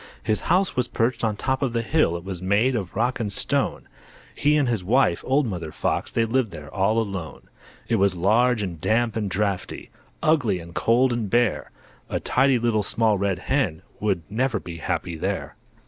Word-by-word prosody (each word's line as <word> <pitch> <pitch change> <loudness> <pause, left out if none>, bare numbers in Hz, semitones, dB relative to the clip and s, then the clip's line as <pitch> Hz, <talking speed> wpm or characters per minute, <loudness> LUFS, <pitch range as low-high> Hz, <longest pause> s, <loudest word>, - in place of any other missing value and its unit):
His 110 - +1
house 190 +1 +3
was 125 -1 +1
perched 115 +2 -1
on 110 -2 +1
top 130 +5 -1
of 130 -4 0
the 115 -1 0
hill, 115 - +2
It 85 - -10
was 95 -2 -6
made 105 +7 +2
of 95 -6 -4
rock 120 +5 0
and 105 -3 -2
stone; - - -1 0.5
He 150 +1 +2
and 145 -3 +2
his 115 -6 0
wife, 105 -4 +2
old 140 +2 +3
Mother 85 -8 -4
Fox, - - -2
They 115 - +1
lived 120 0 +1
there 75 -4 -10
all 100 +3 +1
alone. 100 -8 -4 0.4
It - - +2
was 100 -1 +3
large 110 +5 +2
and 85 -5 -5
damp 115 +2 +1
and 105 -3 -1
draughty, 100 -1 -2 0.3
Ugly 145 - +2
and 85 0 -11
cold 120 +5 +3
and 115 -4 -2
bare; 120 0 +1 0.4
A - - -1
tidy 135 -1 +3
Little 115 -2 +1
Small 105 0 +1
Red 100 -2 0
Hen 95 - -1 0.2
Would 100 -5 0
never 120 +2 0
be 85 -2 -8
happy 85 0 -3
there. - - -3
110 Hz, 195 wpm, -24 LUFS, 95-125 Hz, 0.5 s, house